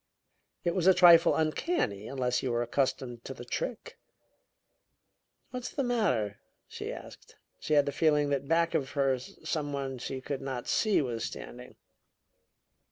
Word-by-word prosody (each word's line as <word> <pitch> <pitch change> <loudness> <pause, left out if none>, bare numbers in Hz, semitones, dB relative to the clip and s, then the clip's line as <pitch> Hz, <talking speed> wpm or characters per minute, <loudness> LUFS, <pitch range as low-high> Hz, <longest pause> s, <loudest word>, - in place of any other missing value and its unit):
It 170 - +1
was 185 -1 +1
a 190 - +7
trifle 170 -2 +7
uncanny, 155 - -1
unless 125 -2 -1
you 130 - -1
were 120 0 +1
accustomed 120 -1 -2
to 135 - -7
the 120 - -9
trick. 235 - -5 1.5
"What's 250 -1 -5
the 275 - -2
matter?" 170 - 0 0.3
she - - -6
asked. - - -11 0.2
She 155 - 0
had 145 -1 +5
the 140 - -1
feeling 150 0 +2
that 140 0 -1
back 165 +1 +2
of 135 - 0
her 135 -3 +2
some 145 +3 -4
one 135 -2 -3
she 130 +2 -4
could 135 +1 -4
not 130 -3 -5
see 215 -8 +2
was 120 -3 -3
standing. 125 +1 -8
140 Hz, 155 wpm, -30 LUFS, 125-165 Hz, 1.5 s, a